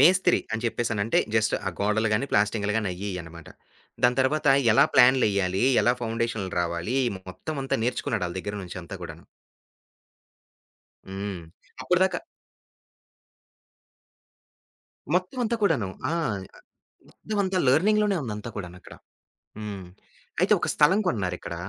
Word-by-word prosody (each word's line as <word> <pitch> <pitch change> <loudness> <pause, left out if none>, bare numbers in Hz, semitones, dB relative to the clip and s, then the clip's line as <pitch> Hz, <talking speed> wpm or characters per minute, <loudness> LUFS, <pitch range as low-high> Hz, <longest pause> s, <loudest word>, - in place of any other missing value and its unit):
మేస్త్రి 185 +2 +5
అని 110 - -2
జేప్పేసినంటే 115 -2 0 0.2
జస్ట్ 110 -1 +2
ఆ - - -2
గోడలు 105 +2 +1
గానీ, 125 +6 0
ప్లాస్టింగ్లు 105 0 +1
గానీ, 110 -3 0
అయ్యియ్యనమాట. 90 -4 -7 0.6
దాని 125 +1 +3
తర్వాత 150 +3 +1 0.2
ఎలా - - +6
ప్లాన్‌లెయ్యాలి? 100 -7 +4 0.2
ఎలా 120 - +4
ఫౌండేషన్లు 115 -4 -2
రావాలి? 85 +8 -2 0.3
మొత్తమంతా 135 +7 -3
నేర్చుకున్నాాడు. 115 -5 -1
ఆళ్ళ 85 - -7
దగ్గర 105 +2 -5
నుంచి 90 0 -7
అంతా 85 +3 -9
కూడాను. 85 -1 -9 1.9
హ్మ్. 95 -2 -5 0.4
అప్పటిదాకా 180 +7 +2 3.0
మొత్తమంతా 230 +6 0
కూడాను. 145 - +2 0.2
ఆ! - - -1 0.4
ఆహ్, - - -26
మొత్తమంతా 200 -3 -2
లెర్నింగ్‌లోనే 205 +8 +3
ఉందంతా 105 -2 -5
కూడానక్కడ. 90 -2 -8 0.7
హ్మ్. 100 -3 -6 0.5
అయితే - - +3
ఒక - - -1
స్థలం 175 +7 +4
కోన్నారిక్కడ 95 - -2
110 Hz, 110 wpm, -26 LUFS, 95-145 Hz, 3.0 s, ఎలా